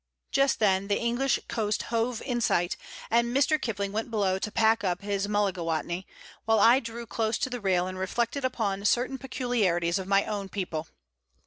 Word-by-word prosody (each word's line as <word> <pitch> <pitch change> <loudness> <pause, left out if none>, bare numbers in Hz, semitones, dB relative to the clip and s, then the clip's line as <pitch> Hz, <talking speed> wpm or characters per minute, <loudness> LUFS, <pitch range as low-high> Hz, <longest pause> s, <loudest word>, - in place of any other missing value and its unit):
Just 275 0 +3
then 195 -2 +2
the 200 - +1
English 240 +3 +1
coast 215 -2 -1
hove 230 0 0
in 240 -2 -1
sight, 175 -5 +1 0.4
and 235 +2 +2
Mr. 305 +3 +3
Kipling 200 -4 -2
went 220 +3 -3
below 195 -4 +1
to 210 - -3
pack 225 +1 +3
up 180 -1 -1
his 200 -1 -1
mullagatawny, 180 -3 -1 0.4
while 225 -1 +3
I 235 +5 +6
drew 235 -1 -7
close 225 0 -1
to 260 - -2
the 245 -2 -4
rail 185 -3 +2
and 185 0 -5
reflected 235 +8 -1
upon 215 -6 -1
certain 255 +4 +1
peculiarities 200 -10 0
of 190 - -6
my 195 0 +3
own 200 -2 -4
people. 170 -6 -4
210 Hz, 180 wpm, -28 LUFS, 190-235 Hz, 0.4 s, I